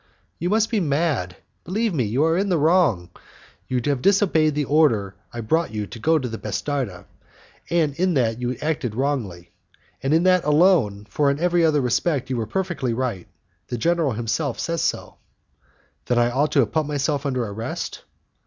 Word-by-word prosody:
"You 175 Hz, -, -1 dB
must 220 Hz, +2 st, +2 dB
be 225 Hz, -, +2 dB
mad; 145 Hz, -, 0 dB, 0.3 s
believe 215 Hz, +4 st, -1 dB
me, 130 Hz, -7 st, 0 dB
you 120 Hz, +8 st, +1 dB
are 165 Hz, +1 st, +2 dB
in 195 Hz, +3 st, 0 dB
the 175 Hz, -, +2 dB
wrong. 155 Hz, -, +2 dB, 0.6 s
You 125 Hz, -, 0 dB
have 140 Hz, -3 st, 0 dB
disobeyed 175 Hz, -6 st, +3 dB
the 150 Hz, -1 st, 0 dB
order 120 Hz, -11 st, +2 dB, 0.2 s
I 120 Hz, -, -5 dB
brought 160 Hz, +10 st, 0 dB
you 105 Hz, -1 st, -2 dB
to 115 Hz, -, -10 dB
go 160 Hz, +7 st, +3 dB
to 130 Hz, -4 st, -2 dB
the 115 Hz, -1 st, -6 dB
'bastarda; 110 Hz, -2 st, -3 dB, 0.6 s
in 170 Hz, +1 st, +1 dB
that 120 Hz, -2 st, 0 dB
you 120 Hz, -, -1 dB
have 125 Hz, -, -5 dB
acted 145 Hz, -8 st, -2 dB
wrongly, 115 Hz, -11 st, -3 dB, 0.5 s
and 135 Hz, -, -1 dB
in 165 Hz, +2 st, +4 dB
that 185 Hz, -1 st, +4 dB
alone, 150 Hz, -, +3 dB
for 145 Hz, +4 st, +1 dB
in 140 Hz, +1 st, -1 dB
every 175 Hz, 0 st, +2 dB
other 155 Hz, -3 st, +3 dB
respect 130 Hz, +2 st, 0 dB
you 125 Hz, -, -1 dB
were 110 Hz, -2 st, -2 dB
perfectly 170 Hz, -11 st, -2 dB
right, 115 Hz, -8 st, -3 dB, 0.4 s
the 120 Hz, -, -4 dB
general 165 Hz, +1 st, +1 dB
himself 120 Hz, +5 st, -2 dB
says 170 Hz, -1 st, -2 dB
so." -, -, -2 dB, 0.9 s
"Then 120 Hz, -, +1 dB
I 120 Hz, 0 st, +3 dB
ought 145 Hz, +5 st, +1 dB
to 140 Hz, -, +5 dB
have 110 Hz, -5 st, -1 dB
put 155 Hz, +4 st, 0 dB
myself 145 Hz, -1 st, -1 dB
under 130 Hz, -4 st, -1 dB
arrest?" 110 Hz, +2 st, -5 dB
145 Hz, 185 wpm, -23 LUFS, 120-165 Hz, 0.9 s, to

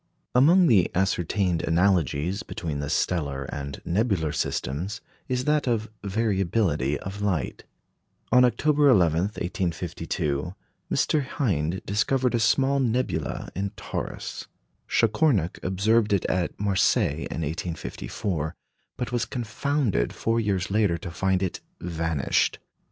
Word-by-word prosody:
Among 165 Hz, +9 st, +6 dB
the 105 Hz, -, +4 dB
ascertained 95 Hz, -1 st, +1 dB
analogies 85 Hz, -, +1 dB
between 80 Hz, -8 st, -4 dB
the 70 Hz, 0 st, -3 dB
stellar 70 Hz, -6 st, 0 dB
and 70 Hz, -1 st, -5 dB
nebular 90 Hz, -4 st, +1 dB
systems 85 Hz, -, -2 dB, 0.3 s
is 125 Hz, 0 st, -1 dB
that 150 Hz, -2 st, +2 dB
of 110 Hz, -2 st, 0 dB
variability 95 Hz, -, +1 dB
of 100 Hz, +2 st, -6 dB
light. 90 Hz, -10 st, -1 dB, 0.7 s
On 125 Hz, 0 st, +7 dB
October 145 Hz, +4 st, +3 dB
11, 85 Hz, -, +4 dB, 0.2 s
1852, 85 Hz, -4 st, -2 dB, 0.4 s
Mr. 150 Hz, -2 st, +2 dB
Hind 95 Hz, -, -1 dB
discovered 125 Hz, +5 st, +1 dB
a 120 Hz, -, +2 dB
small 135 Hz, +4 st, +3 dB
nebula 100 Hz, -, -1 dB
in 100 Hz, +3 st, -1 dB
Taurus. -, -, -5 dB, 0.4 s
Chacornac 110 Hz, -, +2 dB
observed 105 Hz, +4 st, +2 dB
it 100 Hz, -, +1 dB
at 90 Hz, -1 st, -1 dB
Marseilles 95 Hz, -, +2 dB
in -, -, -4 dB
1854, 80 Hz, +1 st, -3 dB, 0.4 s
but 125 Hz, -, -3 dB
was 120 Hz, -1 st, 0 dB
confounded 120 Hz, -, -1 dB
four 115 Hz, +1 st, 0 dB
years 100 Hz, -4 st, -1 dB
later 100 Hz, -5 st, +2 dB
to 85 Hz, -, -7 dB
find 95 Hz, +2 st, +1 dB
it 95 Hz, -, -2 dB, 0.2 s
vanished. 80 Hz, -4 st, 0 dB
95 Hz, 120 wpm, -26 LUFS, 85-115 Hz, 0.7 s, On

